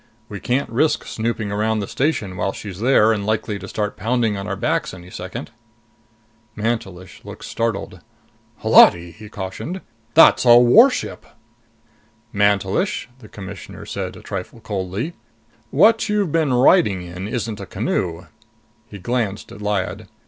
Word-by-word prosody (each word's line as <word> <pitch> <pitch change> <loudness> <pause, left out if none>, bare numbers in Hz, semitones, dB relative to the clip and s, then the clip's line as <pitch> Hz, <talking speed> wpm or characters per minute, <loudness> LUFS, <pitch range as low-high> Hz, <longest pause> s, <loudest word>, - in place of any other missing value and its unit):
We 100 - -6
can't 130 +7 -1
risk 140 +7 +1
snooping 110 -2 -3
around 110 +2 0
the 100 -2 -3
station 125 -10 -1
while 95 +1 -1
she's 100 -3 -8
there 115 -2 +4
and 105 -2 -3
likely 110 -1 -2
to 100 - -8
start 105 -3 -3
pounding 115 0 0
on 100 +1 -5
our 100 - -2
backs 95 - -1
any 90 0 -13
second." 95 +5 -7 1.0
Mantelish 100 -5 -4
looked - - -10
startled. 115 -3 -3 0.6
"Holati," 85 0 +6
he 105 +3 -12
cautioned, 105 - -6 0.3
"That's 165 - +7
a 120 -1 +8
warship!" 225 - +4 1.1
"Mantelish," 100 - +1
the 110 -4 -14
Commissioner 95 -2 -9
said, - - -5
a - - -13
trifle 100 +4 -6
coldly, 105 - -4 0.6
"what 215 +8 +4
you've 205 -5 0
been 160 -3 +1
riding 125 - +4
in 90 +2 -7
isn't 115 -2 -3
a - - -7
canoe." 85 0 -2 0.6
He 100 - -10
glanced 105 0 -3
at 105 - -11
Lyad. 105 -2 -2
105 Hz, 140 wpm, -21 LUFS, 95-120 Hz, 1.1 s, a